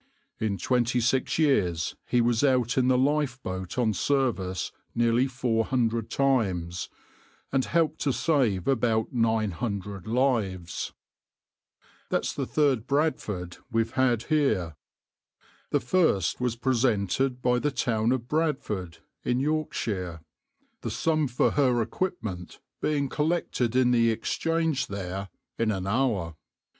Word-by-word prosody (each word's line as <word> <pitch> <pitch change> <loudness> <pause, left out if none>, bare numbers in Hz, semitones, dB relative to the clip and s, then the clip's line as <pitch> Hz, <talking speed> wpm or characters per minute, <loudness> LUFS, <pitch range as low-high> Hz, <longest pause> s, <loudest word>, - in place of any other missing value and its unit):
In 105 -3 -1
twenty 125 +1 +1
six 125 +3 +1
years 90 - +2
he 125 - +3
was 120 0 +2
out 130 -2 +2
in 130 -2 +3
the 130 -1 +4
lifeboat 130 -10 -1
on 115 -4 +2
service 105 -7 0 0.2
nearly 120 +2 +3
four 120 -4 0
hundred 115 -3 0
times, 95 -11 0 0.6
and 135 -1 +1
helped 160 -1 +1
to 140 - +2
save 125 - +1
about 115 -4 +1
nine 110 -3 +1
hundred 100 0 -4
lives. 110 -8 0 1.2
That's - - 0
the - - -3
third 140 -7 +1
{\itshape{Bradford}} 110 - -1
we've 115 0 +1
had 125 -3 +2
here. 110 - +1 0.9
The - - +2
first 125 - +1
was 125 -2 0
presented 125 0 +1
by 125 0 +2
the 145 - +1
town 115 -3 0
of 125 -2 -1
Bradford 125 - -1 0.3
in 125 - +1
Yorkshire, 110 - -2 0.6
the - - -3
sum 155 -2 +1
for 125 -1 +2
her 130 -4 +2
equipment 110 - -3 0.2
being 145 -2 +1
collected 150 -6 -1
in 130 -1 +4
the 115 -1 +4
Exchange 155 +4 0
there 95 0 -5 0.3
in 115 -1 +2
an 95 -3 -1
hour. 100 - 0
120 Hz, 125 wpm, -27 LUFS, 100-135 Hz, 1.2 s, the